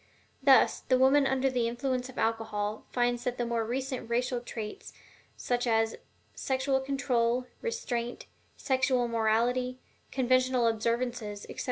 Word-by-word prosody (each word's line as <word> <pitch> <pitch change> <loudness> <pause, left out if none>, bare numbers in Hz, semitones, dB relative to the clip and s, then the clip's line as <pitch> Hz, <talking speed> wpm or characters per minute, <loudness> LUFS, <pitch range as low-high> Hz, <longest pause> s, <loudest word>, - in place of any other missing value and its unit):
Thus, 270 -1 +5
the 255 - +1
woman 270 +2 +5
under 265 0 +1
the 250 -3 +1
influence 250 +1 -2
of 260 - -12
alcohol 220 -2 -1
finds 245 -1 0
that 250 -1 -2
the 240 - -1
more 235 -1 0
recent 255 +1 -3
racial 245 +1 0
traits, 235 - -7 0.4
such 245 0 -1
as 225 -1 +2 0.4
sexual 265 0 0
control, 255 -3 0 0.2
restraint, 250 - -3 0.3
sexual 260 -2 +1
morality, 235 +3 +1 0.3
conventional 255 -1 +2
observations, 230 -2 -1
etc. - - -9
245 Hz, 130 wpm, -29 LUFS, 230-260 Hz, 0.4 s, Thus